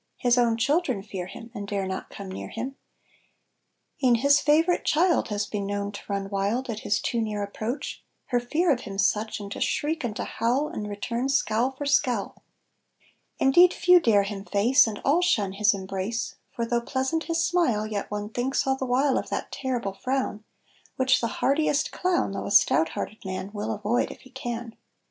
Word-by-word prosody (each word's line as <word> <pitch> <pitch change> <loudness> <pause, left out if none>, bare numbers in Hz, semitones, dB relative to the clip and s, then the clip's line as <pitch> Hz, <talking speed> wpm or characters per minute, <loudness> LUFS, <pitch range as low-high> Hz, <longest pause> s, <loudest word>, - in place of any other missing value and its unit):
His 245 -2 +3
own 235 -2 +3
children 270 - +1
fear 190 -4 -6
him 230 +4 -10
And 205 -3 -6
dare 200 -1 -2
not 190 0 -5
come 200 - -8
near - - -6
him; 255 +4 -5 1.3
E'en 245 -2 +5
his 280 +4 +4
favorite 320 +5 +3
child 340 +2 +2
Has 205 -1 -1
been 200 -1 -4
known 200 0 -2
to 200 - -8
run 200 -1 -2
wild 210 +6 -1
At 215 - -5
his 210 - 0
too 235 - -1
near 210 -2 -2
approach, 215 +6 -5 0.3
Her 245 - +2
fear 310 +8 +1
of 255 - +2
him 200 -5 -7
such, 210 +2 +1
And 200 -1 -8
to - - -6
shriek 315 +1 0
and 225 -4 -3
to - - -3
howl 255 +6 0
And 210 -1 -5
return 235 +5 -2
scowl 240 -2 +2
for 270 +2 -7
scowl. 250 -7 +1 1.0
Indeed 345 +7 +5
few 360 0 +6
dare 215 -10 +4
him 195 -1 -5
face, 230 +7 +4
And 215 -2 -4
all 300 +6 +4
shun 205 - +1
his 210 +2 +4
embrace; 195 +3 -3 0.2
For 235 - -1
though 235 +1 0
pleasant 265 +6 -1
his 330 -1 +1
smile, 255 -13 +1
Yet 210 -2 -4
one 210 0 -4
thinks 245 +4 -1
all 265 0 +2
the 265 -1 -4
while 265 +2 +2
Of - - -7
that - - -3
terrible 245 -7 -2
frown, 255 -1 -2 0.5
Which 260 0 +3
the 230 - +1
hardiest 285 +4 +1
clown, 360 - 0
Though 195 - -4
a - - -4
stout 160 -5 +5
hearted 215 - -6
man, 190 +1 -5
Will 215 +1 -3
avoid 215 +3 0
if - - -11
he 260 - -17
can. 240 -3 -5
235 Hz, 195 wpm, -26 LUFS, 205-265 Hz, 1.3 s, few